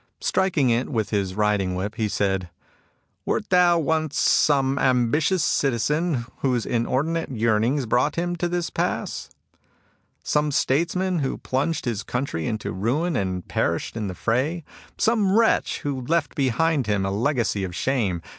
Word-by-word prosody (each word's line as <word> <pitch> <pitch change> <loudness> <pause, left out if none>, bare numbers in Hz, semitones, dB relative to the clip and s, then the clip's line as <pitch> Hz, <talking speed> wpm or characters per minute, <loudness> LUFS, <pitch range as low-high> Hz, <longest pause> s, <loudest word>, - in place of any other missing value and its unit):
Striking 170 -9 +1
it 120 +2 0
with 110 -6 -2
his 95 -3 -1
riding 105 -3 +1
whip, 95 +3 -3
he 110 -1 -1
said: 95 -3 -1 0.4
" - - -44
Wert - - -1
thou 180 -1 +5
once 155 -1 0
some 140 -2 +3
ambitious 135 +7 +2
citizen 140 +2 0
whose 125 -4 0
inordinate 140 +8 -1
yearnings 115 +3 +1
brought 125 +6 +1
him 175 +1 -1
to 175 - 0
this 175 -1 -2
pass? - - -2 0.5
— - - -38 0.3
some 150 0 +1
statesman 170 +6 +1
who 135 -3 -2
plunged 145 +5 -2
his 115 -5 -1
country 125 - -3
into 110 -1 -3
ruin 130 - -1
and 95 -2 -2
perished - - -1
in 110 -3 -3
the 95 - -5
fray? 135 - -1 0.2
— - - -24
some 215 -3 +2
wretch 230 -1 +2
who 140 -3 -3
left 165 -1 +1
behind 140 +1 +1
him 105 -2 +1
a 95 - -1
legacy 115 -2 0
of 90 -2 -5
shame? 100 -9 -1
130 Hz, 155 wpm, -24 LUFS, 110-160 Hz, 0.5 s, thou